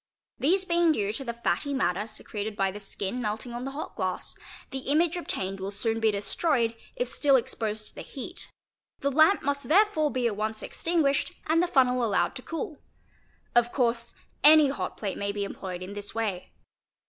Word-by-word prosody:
These 370 +7 +3
being 340 -2 +3
due 210 -5 -1
to 270 - -4
the 235 - -3
fatty 255 +4 -1
matter 205 -5 0
secreted 215 -1 -5
by 195 -1 +1
the 205 - -8
skin 200 +3 -3
melting 220 +2 -3
on 240 +2 -4
the - - -2
hot 310 - -5
glass, - - -3 0.4
the 270 - -2
image 310 +6 +2
obtained 195 - -2
will 190 +1 -3
soon 225 +3 -1
be 225 -1 +3
destroyed 230 +3 0 0.2
if 245 - -1
still 275 +2 +3
exposed 220 -4 -1
to - - -11
the - - -8
heat; 315 +7 -6 0.5
the 280 - +1
lamp 315 +7 +5
must 280 -2 -1
therefore 355 -4 +4
be 255 -3 -1
at 225 -3 +1
once 215 +1 -3
extinguished 310 -5 +1
and 320 +2 +3
the 355 - +2
fun 265 -7 +5
nel 250 0 0
allowed 195 -6 +1
to - - -7
cool. 315 0 -5 0.7
Of 240 0 +4
course 235 -2 0 0.3
any 305 -1 +8
hot 275 - -4
plate 200 -3 -3
may 200 0 -1
be 200 0 -2
employed 185 -2 -5
in 190 +2 -7
this 205 +1 -4
way. 210 -5 -2
240 Hz, 195 wpm, -28 LUFS, 210-290 Hz, 0.7 s, any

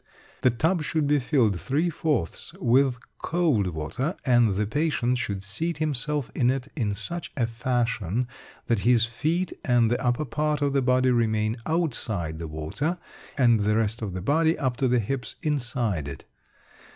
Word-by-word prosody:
The 130 - +5
tub 160 +9 +1
should 150 0 0
be 145 0 +3
filled 120 - +1
three 155 +6 0
fourths 145 - -2
with 130 +1 +3 0.2
cold 160 - +1
water, 85 - -3
and 120 -6 +4
the 105 +2 +1
patient 125 -1 0
should 100 -5 -3
seat 150 - -3
himself 150 -2 -1
in 125 -2 +2
it 135 +1 -1
in 105 -8 -1
such 165 +12 -4
a 120 - +2
fashion 120 -2 -1 0.4
that 115 -3 +1
his 115 +1 +4
feet 160 +10 -1
and 120 -2 +3
the 120 - 0
upper 125 +4 +1
part 150 +3 0
of 140 -1 +1
the 140 - +3
body 130 0 +3
remain 110 -1 +1
outside 115 - -1
the 85 - -4
water, 80 - -3 0.4
and 120 -5 +5
the 105 +1 +2
rest 115 +1 0
of 100 -4 -3
the 90 - -4
body 160 - +2
up 130 -3 -1
to 135 0 +2
the 125 0 +3
hips 125 +3 -2
inside 120 - -1
it. 70 - -8
125 Hz, 170 wpm, -26 LUFS, 110-145 Hz, 0.4 s, The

